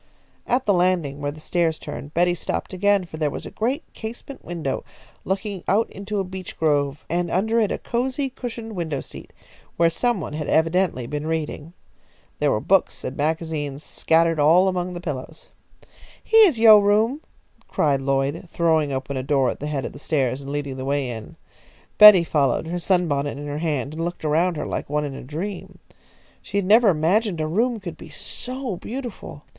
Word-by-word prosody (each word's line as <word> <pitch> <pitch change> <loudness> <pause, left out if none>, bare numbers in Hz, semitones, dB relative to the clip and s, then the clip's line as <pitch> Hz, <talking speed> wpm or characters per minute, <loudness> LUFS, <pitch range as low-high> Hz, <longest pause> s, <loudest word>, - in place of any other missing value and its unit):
At 250 +2 +1
the 205 - +3
landing 175 -6 +1
where 145 - -1
the 150 +2 -8
stairs 165 0 0
turned, 145 0 -8
Betty 175 +1 +3
stopped 175 - -4
again, 200 0 +2
for 160 - -9
there 155 -2 0
was - - -7
a - - -8
great 255 +8 -1
casement 240 +5 -8
window 165 -6 -3 0.4
looking 190 -1 -3
out 215 +4 +2
into 200 +1 -4
a - - 0
beech 185 0 -8
grove, 145 -2 0
and 175 +1 -1
under 220 +6 +1
it 215 -3 +1
a - - -1
cosy 260 +3 -2
cushioned 230 -4 -7
window 160 -6 -2
seat, - - -10 0.5
where 165 0 +4
some 240 +4 0
one 155 - -6
had 150 -1 -4
evidently 165 -5 +1
been 150 +4 -4
reading. 160 0 -3 0.7
There 150 - +2
were 110 - +1
books 195 - +1
and 130 - -4
magazines 155 -2 -2
scattered 165 0 +2
all 165 +6 +5
among 180 -1 -1
the 175 - -6
pillows. 155 -1 -6 0.7
"Heah 445 -1 +7
is 305 -10 0
yo' 220 -2 +8
room!" 215 +8 +2 0.5
cried 140 -3 +1
Lloyd, 135 +5 -1
throwing 160 -4 +1
open 135 +1 -3
a - - -1
door 135 -1 +1
at - - -8
the 150 - -4
head 145 -3 -2
of - - -6
the 140 - -11
stairs, 135 -4 0
and 140 0 -7
leading 140 -2 -3
the 130 - -5
way 140 -2 -1
in. 110 -2 -8 0.6
Betty 210 -4 +10
followed, 145 -4 +1
her 175 +2 -3
sunbonnet 160 -7 0
in 145 - -7
her 145 0 -4
hand, 150 -4 -2
and 165 +1 -4
looked 175 -1 -4
around 165 +3 +2
her - - -3
like - - -4
one 150 0 0
in 140 - -5
a - - -8
dream. 175 +9 -6 0.6
She - - -4
had 200 - +1
never 220 +3 +6
imagined 180 +3 +1
a 155 - 0
room 225 +9 0
could 175 -5 -7
be - - -11
so 255 -5 -5
beautiful. 235 - -7
165 Hz, 195 wpm, -23 LUFS, 145-200 Hz, 0.7 s, Betty